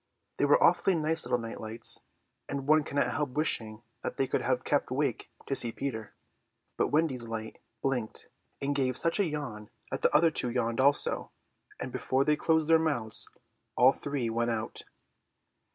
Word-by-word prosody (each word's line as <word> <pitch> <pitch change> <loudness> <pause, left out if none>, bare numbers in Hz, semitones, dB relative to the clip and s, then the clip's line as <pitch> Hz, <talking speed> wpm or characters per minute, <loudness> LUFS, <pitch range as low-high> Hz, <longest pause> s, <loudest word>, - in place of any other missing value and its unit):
They - - +2
were 485 - +4
awfully 195 - +4
nice 160 0 +2
little - - +2
night 115 -1 -7
lights, 110 +1 0 0.5
and 140 -1 -4
one 155 0 +5
cannot 145 0 0
help 145 -4 -2
wishing 115 -7 -1 0.2
that - - -4
they 135 - +2
could - - -1
have 130 0 0
kept 145 - 0
awake 130 -2 -2 0.2
to - - -2
see 120 - +6
Peter; 110 -5 -5 0.6
but - - +1
Wendy's 145 -6 0
light 110 -1 -6 0.2
blinked 125 -5 -2 0.3
and 140 +1 -1
gave 130 -3 0
such 165 +4 +1
a 200 - +3
yawn 120 -9 -6 0.2
that - - -3
the - - +4
other 165 +1 +4
two 125 - -1
yawned 115 0 -1
also, 140 +1 +2 0.5
and - - -5
before 135 +1 0
they 150 - +3
could - - -13
close 160 -1 +3
their 160 +1 +5
mouths 120 -9 -1 0.5
all 130 +2 +6
the - - -12
three 140 -4 -2
went 115 +1 0
out. 110 -2 -3
135 Hz, 185 wpm, -29 LUFS, 115-150 Hz, 0.6 s, see